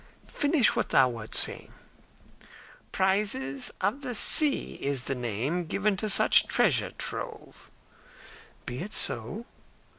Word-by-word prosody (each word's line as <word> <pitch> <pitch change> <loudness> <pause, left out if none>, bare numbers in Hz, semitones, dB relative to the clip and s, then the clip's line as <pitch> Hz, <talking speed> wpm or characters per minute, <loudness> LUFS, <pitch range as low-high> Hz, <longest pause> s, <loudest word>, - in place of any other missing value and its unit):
"Finish 285 -5 +1
what - - -2
thou 130 -2 +4
wert 115 -3 -6
saying." - - 0 1.2
"'Prizes 190 -9 -1
of 210 +9 -1
the 250 -3 -5
sea' 295 +6 +3
is 140 -2 -1
the 135 - -2
name 125 - -3
given 200 +5 -1
to 215 +2 -2
such - - +4
treasure - - +2
trove." - - -3 1.0
"Be 125 +1 -5
it 210 +7 -6
so." 120 - -1
185 Hz, 120 wpm, -27 LUFS, 130-215 Hz, 1.2 s, thou